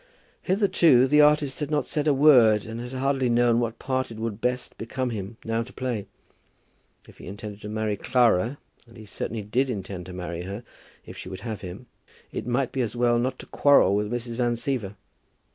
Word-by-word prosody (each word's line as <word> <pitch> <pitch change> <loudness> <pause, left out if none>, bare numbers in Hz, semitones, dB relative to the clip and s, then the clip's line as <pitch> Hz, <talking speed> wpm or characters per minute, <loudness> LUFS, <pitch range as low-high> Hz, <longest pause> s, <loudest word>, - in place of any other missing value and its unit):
Hitherto 175 - +4
the 150 +2 +5
artist 150 -2 +3
had 150 -2 -3
not 150 -1 0
said 150 -1 -2
a - - +5
word, 125 -7 +5
and 115 +1 -6
had 125 +1 -7
hardly 135 -1 0
known 120 0 +3
what 115 -1 -2
part 130 0 -2
it 115 - -9
would 110 -1 -4
best 125 0 -2
become 125 +2 -3
him 105 0 -6
now 115 0 0
to 120 +2 -8
play. 120 -7 -4 1.0
If - - -17
he - - -10
intended 100 +2 -8
to 105 - -7
marry 110 -1 -1
Clara, 120 +2 +2 0.3
and 115 +1 -16
he 110 - -11
certainly 105 +2 -5
did 125 +6 0
intend 95 -5 -5
to 90 - -8
marry 90 -1 -5
her 100 +6 -6 0.4
if - - -10
she - - -7
would 95 - -8
have 110 -3 -5
him, 95 +6 -8 0.5
it - - -5
might 125 +1 0
be 130 - -1
as 120 -1 -2
well 120 0 +2
not 130 +2 -1
to - - -10
quarrel 140 -9 +4
with 105 +1 -1
Mrs. 120 -1 -4
Van 120 -1 +1
Siever. 115 -5 -3
120 Hz, 205 wpm, -25 LUFS, 105-130 Hz, 1.0 s, the